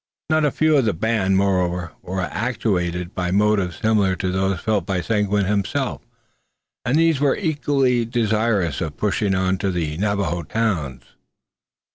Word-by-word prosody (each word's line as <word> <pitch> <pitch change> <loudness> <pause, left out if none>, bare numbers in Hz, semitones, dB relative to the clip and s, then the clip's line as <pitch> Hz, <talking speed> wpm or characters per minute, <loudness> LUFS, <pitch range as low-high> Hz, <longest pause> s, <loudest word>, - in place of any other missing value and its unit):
Not 155 -1 +3
a - - +3
few 155 +2 +2
of 135 - +3
the 110 - +1
band, 95 0 +1
moreover, 90 -3 0
were 95 +1 -4
actuated 90 -4 -2
by 90 -1 -2
motives 100 -3 +1
similar 105 -4 +2
to 90 +1 -2
those 95 -1 0
felt 105 -1 0
by 95 +1 -1
Seguin 105 +1 0
himself, 100 0 -1 0.8
and 130 +5 +1
these 165 -3 +3
were 140 -1 +2
equally 140 - +1
desirous 110 - 0
of 80 -3 -4
pushing 100 -1 0
on 95 0 0
to 100 - 0
the 80 -4 -2
Navajo 100 -4 -1
towns. 85 - -2
100 Hz, 150 wpm, -21 LUFS, 90-115 Hz, 0.8 s, Not